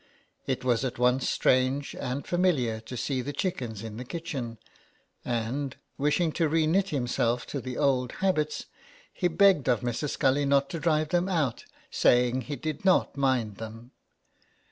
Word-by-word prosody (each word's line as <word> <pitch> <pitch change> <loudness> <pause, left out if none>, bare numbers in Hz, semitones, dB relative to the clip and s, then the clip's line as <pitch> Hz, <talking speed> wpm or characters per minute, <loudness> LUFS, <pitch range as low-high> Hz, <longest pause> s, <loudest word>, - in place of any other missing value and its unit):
It - - -1
was 125 -1 +2
at 130 -2 -3
once 125 +1 +2
strange 130 +2 +2
and 130 +3 -4
familiar 150 -12 +1
to 115 +3 -8
see 130 +1 -1
the 145 - -4
chickens 120 - -3
in 110 -1 -7
the 125 - -5
kitchen; 130 -6 -5 0.7
and, 125 +4 -2 0.2
wishing 150 +4 +1
to 160 0 +1
re 160 +1 +2
knit 190 +5 +2
himself 120 -4 0
to 140 - -4
the 125 0 -5
old 130 -4 +1
habits, 155 -6 0 0.5
he 180 - +1
begged 175 -5 +4
of 125 - +2
Mrs. 125 +4 -2
Scully 140 0 +2
not 140 0 +2
to 165 - -3
drive 155 -1 +1
them 175 +3 +1
out, 150 -10 -1 0.3
saying 125 +1 +3
he 145 +4 -5
did 155 +3 -5
not 185 -6 +3
mind 130 -7 0
them. 115 +2 -9
135 Hz, 165 wpm, -28 LUFS, 125-155 Hz, 0.7 s, begged